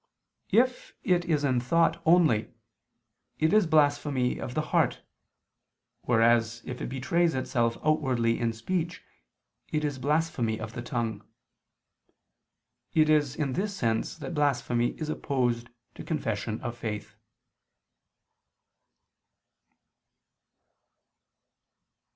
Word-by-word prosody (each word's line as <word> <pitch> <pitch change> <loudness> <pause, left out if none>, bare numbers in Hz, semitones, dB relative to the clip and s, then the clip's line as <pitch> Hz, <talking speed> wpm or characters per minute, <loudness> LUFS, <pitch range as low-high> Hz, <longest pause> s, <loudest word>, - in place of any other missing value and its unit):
If 250 +2 +1
it 180 -1 +2
is 155 -4 +1
in 130 -3 +2
thought 165 +7 +2
only, 160 -10 +4 0.9
it 160 +4 +2
is 210 -4 +5
blasphemy 145 -4 +2
of 125 - -6
the 155 - +1
heart, - - +2 1.0
whereas 115 0 +3
if 125 - -6
it - - -3
betrays 160 +6 +1
itself 120 -3 0
outwardly 130 -7 +1
in 115 -1 +1
speech 170 +9 -3 0.7
it 150 0 -1
is 145 -3 -3
blasphemy 140 -6 0
of 110 0 -6
the 120 - -5
tongue. 115 -5 -3 1.7
It 155 -1 +5
is 145 -3 +2
in 145 -4 -1
this 200 +4 -2
sense 115 -2 -1
that 145 -2 -6
blasphemy 125 -5 0
is 155 - -3
opposed 125 -6 -1 0.2
to - - -9
confession 115 -8 -2
of 120 -1 -4
faith. 105 -2 -5
135 Hz, 105 wpm, -28 LUFS, 120-155 Hz, 1.7 s, is